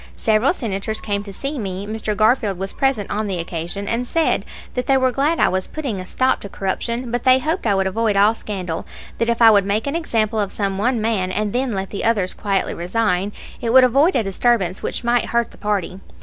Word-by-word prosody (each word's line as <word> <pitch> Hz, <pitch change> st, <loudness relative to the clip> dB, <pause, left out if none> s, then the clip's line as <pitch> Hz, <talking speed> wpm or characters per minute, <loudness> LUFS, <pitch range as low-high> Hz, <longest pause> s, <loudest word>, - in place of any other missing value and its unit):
Several 220 Hz, +4 st, +3 dB
Senators 220 Hz, -, -3 dB
came 205 Hz, -2 st, -2 dB
to 275 Hz, +8 st, -5 dB
me 195 Hz, -2 st, -4 dB
Mr. 215 Hz, -1 st, -3 dB
Garfield 215 Hz, -3 st, +2 dB
was 195 Hz, +1 st, -4 dB
present 270 Hz, -7 st, 0 dB
on 215 Hz, 0 st, -1 dB
the 190 Hz, -2 st, -2 dB
occasion 170 Hz, +4 st, -4 dB
and 240 Hz, +3 st, -1 dB
said 325 Hz, +3 st, +1 dB, 0.3 s
that 250 Hz, -1 st, -3 dB
they 270 Hz, -, +4 dB
were 260 Hz, -1 st, +2 dB
glad 290 Hz, +6 st, +1 dB
I -, -, +5 dB
was 185 Hz, 0 st, -1 dB
putting 270 Hz, -11 st, -4 dB
a 185 Hz, -, -7 dB
stop 260 Hz, +5 st, +1 dB
to 200 Hz, -, -7 dB
corruption, 235 Hz, +6 st, -3 dB
but 245 Hz, 0 st, -1 dB
they 255 Hz, 0 st, +6 dB
hoped 310 Hz, +1 st, -1 dB
I 200 Hz, -, +3 dB
would 195 Hz, 0 st, +1 dB
avoid 215 Hz, +2 st, 0 dB
all 205 Hz, +2 st, +5 dB
scandal; 185 Hz, -7 st, -5 dB, 0.3 s
that 230 Hz, -, +1 dB
if 235 Hz, 0 st, +2 dB
I 225 Hz, -, +9 dB
would 200 Hz, -2 st, +5 dB
make 200 Hz, +3 st, -1 dB
an 280 Hz, +2 st, -2 dB
example 225 Hz, -9 st, 0 dB
of 200 Hz, -2 st, -1 dB
some 195 Hz, -2 st, -2 dB
one 240 Hz, +3 st, +1 dB
man 210 Hz, -5 st, 0 dB
and 210 Hz, +1 st, -1 dB
then 250 Hz, -1 st, 0 dB
let 195 Hz, -1 st, -3 dB
the 200 Hz, -, -4 dB
others 205 Hz, -5 st, +1 dB
quietly 195 Hz, -2 st, -1 dB
resign, 190 Hz, +1 st, 0 dB, 0.3 s
it 230 Hz, -1 st, -1 dB
would 260 Hz, 0 st, +8 dB
avoid 275 Hz, +8 st, +4 dB
a -, -, +2 dB
disturbance 195 Hz, -2 st, +1 dB
which -, -, -4 dB
might 240 Hz, 0 st, +2 dB
hurt 235 Hz, -1 st, 0 dB
the -, -, -16 dB
party. 200 Hz, -3 st, -2 dB
215 Hz, 225 wpm, -20 LUFS, 195-245 Hz, 0.3 s, I